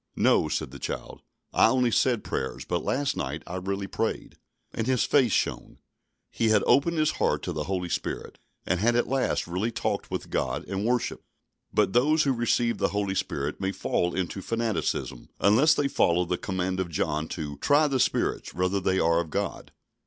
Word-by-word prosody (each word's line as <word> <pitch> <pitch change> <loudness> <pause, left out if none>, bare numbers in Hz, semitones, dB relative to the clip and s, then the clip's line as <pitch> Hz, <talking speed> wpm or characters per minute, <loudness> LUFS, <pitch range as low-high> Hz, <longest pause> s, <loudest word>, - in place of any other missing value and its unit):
"No," - - +3
said - - -2
the 70 - -10
child, - - -5 0.3
"I - - +6
only 125 0 +2
said 120 -1 +2
prayers, 65 - -4
but 90 -1 -2
last 145 +1 0
night 75 +4 -4
I 90 - -5
really 95 +1 -3
prayed." 110 +3 -3 0.3
And 115 - -2
his 130 -5 +2
face 130 -6 +3
shone. - - -1 0.5
He 115 - +1
had 105 -2 +4
opened 170 +4 +3
his 155 -1 +3
heart - - 0
to - - -3
the 75 -1 -3
Holy 90 -1 -2
Spirit, - - -4 0.3
and 90 +1 0
had 120 +4 +2
at 120 - +3
last 135 -1 0
really 90 +6 -1
talked 115 - -2
with - - -5
God - - -1
and 100 +2 -2
worshipped. 125 0 -1 0.4
But 100 -3 +2
those 150 +6 +4
who 135 - +2
receive 120 -1 +1
the - - +2
Holy 100 0 -1
Spirit 95 - -3
may 95 0 0
fall 90 -2 -1
into 95 +1 -2
fanaticism, 115 - -2
unless 115 - +5
they 145 - +1
follow 90 -8 +2
the 90 - -1
command 95 0 -2
of 95 -2 -1
John 75 0 -1
to 75 -3 -5
"try 145 - +3
the 135 -2 0
spirits, - - 0
whether 90 +2 +1
they 95 0 +1
are 85 -1 +3
of 85 -2 -3
God." - - -3
100 Hz, 190 wpm, -27 LUFS, 90-120 Hz, 0.5 s, I